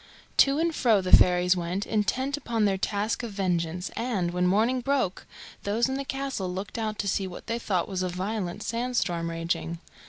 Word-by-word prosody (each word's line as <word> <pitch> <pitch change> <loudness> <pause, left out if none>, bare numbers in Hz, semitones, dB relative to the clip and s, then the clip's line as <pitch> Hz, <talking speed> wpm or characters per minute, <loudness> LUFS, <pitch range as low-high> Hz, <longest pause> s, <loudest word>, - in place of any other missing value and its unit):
To 275 +1 +5
and 330 +1 +1
fro 230 -8 +3
the 185 -1 +7
fairies 180 0 +4
went, 180 +3 -2
intent 260 +6 0
upon 230 -7 0
their 195 -1 +2
task 205 +4 -1
of 235 -4 -6
vengeance, 180 -2 -1
and, 205 -8 -1
when 180 0 +1
morning 225 +7 +2
broke, 260 -8 -1 0.3
those 220 +4 +1
in 265 - -2
the 275 +1 -2
castle 270 -9 -3
looked 190 +5 -5
out 215 -1 -2
to 200 - -2
see 195 0 0
what 180 - -9
they 230 +1 -2
thought 185 -6 0
was 190 -2 -3
a 185 - -1
violent 190 +1 -3
sand 245 +2 -2
storm 170 -4 0
raging. 165 0 -2
200 Hz, 195 wpm, -27 LUFS, 180-235 Hz, 0.3 s, the